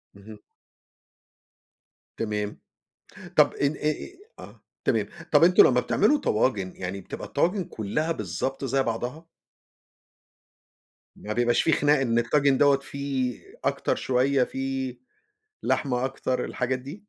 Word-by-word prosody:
اهم. 105 +1 -12 1.8
تمام. 105 -2 -3 0.8
طَب - - +6
إن 140 0 +1
إي 150 +1 0
إيه 360 - -8 0.2
آه. - - -12 0.2
تمام. - - +1 0.2
طَب - - +6
أنتم 180 +1 +7
لمّا 125 -1 +4
بتعملوا 215 - +2
طواجن 105 - 0
يعني 95 +1 -5
بتبقى - - -8
الطواجن 185 +2 0
كُلّها 150 +7 -2
بالضبط 120 - -3
زي 135 0 +1
بعضها؟ 125 +7 -4 1.9
ما 105 - -5
بيبقاش 120 +1 +2
فيه 160 - +2
خناق 145 -1 +3
إن 120 -3 +2
الطاجن 135 +3 +2
دوّة 140 -1 +5
فيه 135 -3 -3 0.2
أكتر - - 0
شوية، 130 +1 +2
فيه 135 -1 -3 0.7
لحمة 125 -2 0
أكتر، 130 -1 -2
الحاجات 130 0 -2
دي؟ 145 +11 -10
130 Hz, 125 wpm, -26 LUFS, 115-140 Hz, 1.9 s, أنتم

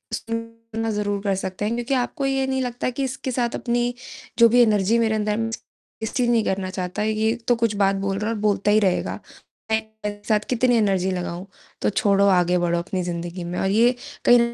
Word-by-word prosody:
सुनना 230 0 -5
ज़रूर 205 -1 -1
कर 200 -2 +1
सकते 190 +1 -4
हैं 220 - 0
क्योंकि 240 +3 -2
आपको 270 +3 -1
ये 270 0 +1
नहीं 265 0 0
लगता 245 0 -2
कि 255 +2 -3
इसके 265 0 -3
साथ 240 -1 -1
अपनी 240 0 0 0.5
जो 230 0 +8
भी 245 +2 +5
एनर्जी 215 -1 +3
मेरे 220 -1 +2
अंदर 210 0 0
है 210 - 0
मैं 225 0 -1
उसे 225 - -5 0.4
वेस्ट 220 +4 -3
नहीं 240 -2 +3
करना 190 -1 -1
चाहता। 185 +2 -3
ये 220 +1 +1
तो 245 - +4
कुछ 230 -2 0
बात 195 -1 +2
बोल 195 0 -2
रहा 210 +1 -1
है - - 0
और - - -5
बोलता 205 -1 +2
ही 215 - +5
रहेगा। 190 -4 0 0.5
मैं 220 - +4 0.3
मेरे 205 0 -4
साथ 215 -2 +3
कितनी 250 0 +3
एनर्जी 190 -3 +1
लगाऊँ? 180 0 -4 0.4
तो - - +2
छोड़ो 200 -1 +3
आगे 180 -2 +3
बढ़ो 170 -1 +1
अपनी 185 +1 -3
ज़िन्दगी 175 +1 -4
में 175 +1 -4
और 190 - +1
ये 235 +5 +4 0.3
कई 245 0 +7
215 Hz, 220 wpm, -23 LUFS, 195-235 Hz, 0.5 s, जो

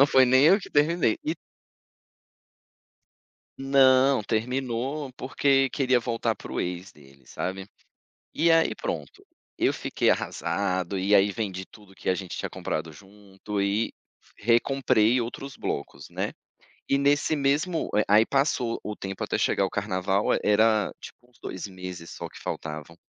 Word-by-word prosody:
Não 140 - +9
foi 130 -2 +5
nem 130 +2 +5
eu 195 +4 +6
que 200 - -10
terminei. 150 -5 +2
E 155 - -1 2.3
Não, 135 -2 +4
terminou 125 +5 -2
porque 135 +1 +2
queria 130 -3 +2
voltar 115 -1 -1
pro - - -5
ex 90 +1 -4
dele, 70 -2 -20
sabe, 95 +1 -5 0.7
e 165 +1 +3
aí 165 0 +4
pronto. - - -6 0.3
Eu - - +2
fiquei - - 0
arrasado, 95 -1 -1
e 100 +3 +2
aí 100 0 +5
vendi 95 -3 -4
tudo 100 -1 -18
que - - -7
a - - +2
gente 90 0 -6
tinha - - -4
comprado 80 0 -4
junto 100 +3 -7
e 100 +3 0 0.4
recomprei 120 0 +2
outros 135 +4 -6
blocos, 70 - -5
né. - - -3 0.6
E 140 - +3
nesse 145 +2 +2
mesmo 150 +5 0 0.2
aí 105 +3 +5
passou 135 -4 0
o 105 - -5
tempo 95 0 -6
até - - -1
chegar - - +1
ao 95 - 0
carnaval, 100 -1 0
é - - +1
era 110 0 +3
tipo 120 - -13
uns 120 - -27
2 95 +2 -6
meses 90 -3 -8
só - - -7
que - - -14
faltavam. 80 +1 -6
110 Hz, 150 wpm, -26 LUFS, 95-135 Hz, 2.3 s, Não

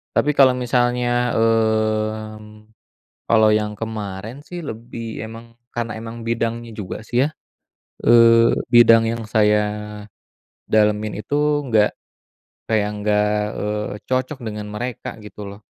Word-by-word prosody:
Tapi 145 - +2
kalau 135 -2 +7
misalnya, 120 0 +1
mmm, 110 -1 -1 0.6
kalau 110 -1 +5
yang 105 0 -3
kemarin 110 +1 -5
sih 175 -1 -6
lebih 115 -4 -7 0.2
emang 115 +1 -9 0.3
karena 115 -2 -3
emang 115 +1 -8
bidangnya 115 0 -2
juga 100 -4 -5
sih 120 - -4
ya, - - 0 0.8
eee, 115 0 +6 0.2
bidang 115 -1 +7
yang 115 0 -4
saya, 105 -1 +4 1.1
dalemin 105 0 +2
itu - - -18 0.4
nggak 110 -3 +4 0.8
kayak 105 -2 +1
nggak, 105 0 +1 0.4
eee, 105 0 -2 0.2
cocok 130 +2 -1
dengan 105 -3 -5
mereka 120 +3 -5 0.2
gitu 105 0 -11
loh. 100 +1 -11
110 Hz, 120 wpm, -21 LUFS, 105-120 Hz, 1.1 s, kalau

